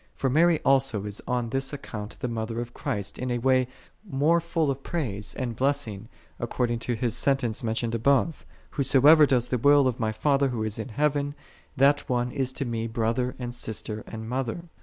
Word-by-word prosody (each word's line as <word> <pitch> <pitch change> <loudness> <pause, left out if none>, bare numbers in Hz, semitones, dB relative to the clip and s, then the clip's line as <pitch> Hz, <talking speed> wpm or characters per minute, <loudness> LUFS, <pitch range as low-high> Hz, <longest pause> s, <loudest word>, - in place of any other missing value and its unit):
For 135 - 0
Mary 165 +2 +4
also 135 -7 +2
is 105 -1 -4
on 120 -2 -1
this 135 +2 -1
account 105 -7 -7
the 125 - -1
Mother 115 0 -3
of 120 0 -5
Christ 100 -2 -4
in 125 - -2
a 120 - 0
way 130 +1 +2 0.4
more 165 -1 +2
full 165 -3 0
of 135 0 -5
praise 110 - -3
and 120 -3 -3
blessing, 115 -6 -1 0.3
according 120 -2 -1
to 120 +1 -2
His 115 0 -1
sentence 125 -6 0
mentioned 115 0 -1
above. 140 +7 +2 0.3
"Whosoever 145 +3 +6
doeth 125 -2 +1
the 125 - +1
will 145 +1 +5
of 125 -2 -2
my 110 -2 0
Father 140 +5 +2
Who 120 -4 -2
is 110 0 -2
in 110 - -5
heaven, 145 +2 0 0.4
that 140 +2 +5
one 125 0 0
is 130 0 -1
to 135 - -3
Me 115 -1 -2
brother, 115 +2 -1
and 120 -1 -5
sister, 110 -2 -4
and 110 0 -7
mother." 130 +5 -2
125 Hz, 190 wpm, -26 LUFS, 115-140 Hz, 0.4 s, Whosoever